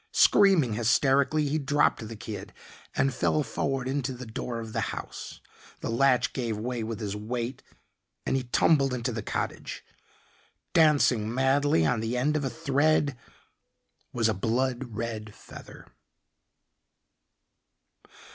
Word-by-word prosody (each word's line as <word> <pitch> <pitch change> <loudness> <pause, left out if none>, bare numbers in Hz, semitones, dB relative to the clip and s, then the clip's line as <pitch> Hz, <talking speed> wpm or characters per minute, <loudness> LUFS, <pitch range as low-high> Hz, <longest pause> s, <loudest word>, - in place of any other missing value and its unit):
Screaming 185 - +5
hysterically 135 +6 +2
he 155 +3 0
dropped 145 -5 +1
the 115 - -7
kid 105 -1 -8 0.4
and 135 0 +2
fell 150 - +1
forward 135 +1 -2
into 135 -1 -2
the 125 0 -8
door 115 +1 -5
of 110 -1 -7
the - - -1
house. - - -7 0.4
The - - -3
latch 125 +1 +3
gave 115 -5 -2
way 120 +2 -3
with 110 0 -4
his 105 -2 -3
weight 120 +4 -4 0.6
and - - 0
he 135 - +1
tumbled 135 +1 +3
into 125 +1 -2
the 115 -1 -4
cottage. - - -4 0.9
Dancing 140 -9 +4
madly 135 - +2
on 120 +7 +1
the 115 +3 -2
end 145 +5 +1
of 150 - 0
a 135 - -1
thread 145 +3 +1 1.0
was 115 -2 +1
a 110 - +2
blood 120 +3 -1
red 110 -2 -5
feather. - - -12
125 Hz, 135 wpm, -27 LUFS, 115-140 Hz, 1.0 s, Screaming